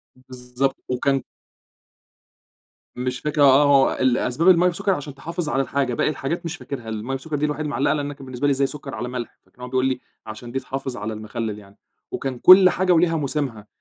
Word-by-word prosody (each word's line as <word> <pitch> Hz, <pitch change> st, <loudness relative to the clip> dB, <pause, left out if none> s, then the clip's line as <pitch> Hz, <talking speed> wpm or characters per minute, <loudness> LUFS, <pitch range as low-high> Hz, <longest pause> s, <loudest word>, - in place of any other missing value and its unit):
بالضبط 130 Hz, +1 st, -4 dB
وكان 135 Hz, +2 st, 0 dB, 1.7 s
مش 125 Hz, 0 st, -3 dB
فاكر، 150 Hz, -1 st, -1 dB
آه 140 Hz, +1 st, +7 dB
آه -, -, +3 dB
هو 140 Hz, -1 st, +4 dB
ال 130 Hz, -2 st, +3 dB
أسباب 160 Hz, +9 st, +2 dB
المَيّة 180 Hz, 0 st, +5 dB
بسكر 185 Hz, +3 st, -1 dB
عشان 145 Hz, -3 st, -6 dB
تحافظ 165 Hz, +2 st, -4 dB
على 135 Hz, -, +1 dB
الحاجة، 135 Hz, -2 st, -1 dB
باقي -, -, +1 dB
الحاجات 155 Hz, +4 st, -3 dB
مش 165 Hz, +1 st, -4 dB
فاكرها، 120 Hz, -6 st, -7 dB
المَيّة 110 Hz, +5 st, -4 dB
بسكر 150 Hz, +3 st, -5 dB
دي 150 Hz, +1 st, 0 dB
الوحيدة 150 Hz, 0 st, -3 dB
اللي 150 Hz, -, -3 dB
معلّقة، 135 Hz, -, +1 dB
لأن 145 Hz, -1 st, -2 dB
أنا 145 Hz, -, -5 dB
كان 135 Hz, -1 st, -12 dB
بالنسبة 130 Hz, +2 st, -2 dB
لي -, -, +3 dB
إزاي 135 Hz, 0 st, +1 dB
سكرعلى 135 Hz, -4 st, -6 dB
ملح؟! 125 Hz, -2 st, -6 dB
فكان 125 Hz, -, -22 dB
هو 125 Hz, -, -6 dB
بيقُول 130 Hz, +1 st, 0 dB
لي 130 Hz, -1 st, 0 dB, 0.3 s
عشان 120 Hz, +2 st, -9 dB
دي 135 Hz, -, -1 dB
تحافظ 135 Hz, -1 st, -5 dB
على 110 Hz, +2 st, -4 dB
المخلل 110 Hz, 0 st, -5 dB
يعني، 100 Hz, 0 st, -18 dB, 0.3 s
وكان 130 Hz, -3 st, -4 dB
كُلّ 185 Hz, 0 st, +8 dB
حاجة 185 Hz, +1 st, +1 dB
وليها 165 Hz, 0 st, +3 dB
موسمها، 135 Hz, -7 st, -3 dB
135 Hz, 210 wpm, -22 LUFS, 125-150 Hz, 1.7 s, كُلّ